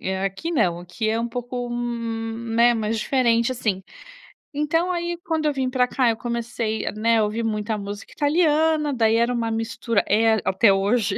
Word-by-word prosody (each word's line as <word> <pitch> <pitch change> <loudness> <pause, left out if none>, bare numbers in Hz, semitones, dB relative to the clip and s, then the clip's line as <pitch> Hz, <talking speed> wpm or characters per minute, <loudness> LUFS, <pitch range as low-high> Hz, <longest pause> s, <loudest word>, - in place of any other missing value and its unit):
É, 190 0 -2
aqui 195 - -3
não, 175 - +1
aqui 180 +5 -4
é 225 +1 +1
um 235 - -2
pouco, 245 0 -4
né, 230 0 0
mais 220 0 -1
diferente, 235 -1 +2
assim. 210 -6 -2 0.7
Então, 325 +5 0
aí, 345 -1 -2
quando 320 -2 -1
eu 295 - +2
vim 265 -1 -1
pra 250 -1 +2
cá, 250 -2 +2
eu 225 - 0
comecei, 235 -2 -3
né, 230 +1 +2
a 215 - +3
ouvir 220 +2 -2
muita 215 0 -2
música 205 0 -7
italiana. 305 -1 +2
Daí 225 -2 +2
era 235 +2 +2
um 230 -2 -1
mistura 225 -1 -1
é 225 +2 +4
até 195 +2 +4
hoje 200 +1 +1
230 Hz, 175 wpm, -23 LUFS, 220-255 Hz, 0.7 s, é